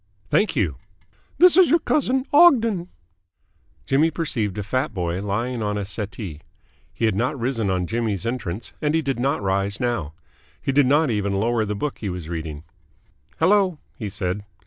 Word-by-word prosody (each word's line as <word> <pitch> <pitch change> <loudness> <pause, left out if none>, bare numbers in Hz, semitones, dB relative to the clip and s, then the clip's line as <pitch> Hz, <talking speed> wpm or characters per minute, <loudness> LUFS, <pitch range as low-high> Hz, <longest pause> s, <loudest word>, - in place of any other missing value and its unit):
"Thank 205 -5 +2
you." 90 - 0 0.6
"This 360 +2 +7
is 370 -1 +6
your 330 - +5
cousin, 265 -5 +1
Ogden." 230 - +5 1.0
Jimmy 150 +4 +3
perceived 115 - -2
a 105 - -2
fat 130 +3 -2
boy 90 0 -2
lying 115 +5 -2
on 105 -1 -1
a 100 - -3
settee. 95 -6 -6 0.5
He 115 - -2
had 110 - +2
not 125 +8 -1
risen 115 -4 -1
on 90 -1 0
Jimmy's 110 -1 -2
entrance, 115 -4 -4
and 150 0 +1
he 160 - +1
did 135 -3 -2
not 135 -3 0
rise 100 +1 0
now. 120 -12 -2 0.5
He - - -1
did 140 -1 +4
not 145 0 +3
even 100 -2 -1
lower 110 +3 +1
the 105 0 -3
book 145 +7 -3
he 105 - -3
was 90 -3 -6
reading. 80 -3 -5 0.7
"Hello," 185 0 +3 0.2
he 110 -6 -5
said. 95 0 -3
115 Hz, 170 wpm, -23 LUFS, 100-150 Hz, 1.0 s, This